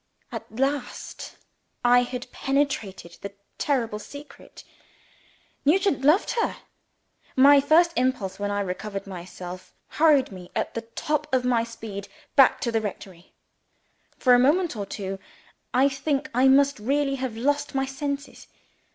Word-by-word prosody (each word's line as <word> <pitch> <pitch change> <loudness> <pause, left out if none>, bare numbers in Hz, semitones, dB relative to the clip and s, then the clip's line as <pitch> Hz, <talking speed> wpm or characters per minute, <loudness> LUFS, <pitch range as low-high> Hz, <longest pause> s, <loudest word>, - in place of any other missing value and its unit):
At - - -8
last 275 -1 -3 0.5
I 245 0 +6
had 245 0 -5
penetrated 265 -11 -2
the 200 0 -7 0.3
terrible 230 -7 0
secret. 285 +6 -12 1.0
Nugent 335 -1 +2
loved 310 +8 +4
her. 460 - -1 0.8
My 280 +2 +7
first 335 +4 +4
impulse, 235 -7 -1
when 205 0 -2
I 205 0 -1
recovered 195 +1 -4
myself, 180 -1 -9
hurried 300 -6 +3
me 180 -2 -10
at - - -2
the 230 - -3
top 295 +6 -3
of 255 -1 +1
my 240 -2 +2
speed 220 -3 -7 0.3
back 270 -2 +6
to 240 -5 -1
the 225 -1 +1
rectory. 190 -3 -8 0.8
For 250 - +4
a 245 - +6
moment 310 +4 +2
or 200 -2 -4
two, 195 -1 -5 0.5
I 260 +2 +4
think 280 +2 -2
I 255 +3 +4
must 275 -1 +4
really 275 +4 0
have 255 -4 -4
lost 290 +4 0
my 270 0 +1
senses. 280 +1 -5
255 Hz, 140 wpm, -25 LUFS, 210-285 Hz, 1.0 s, My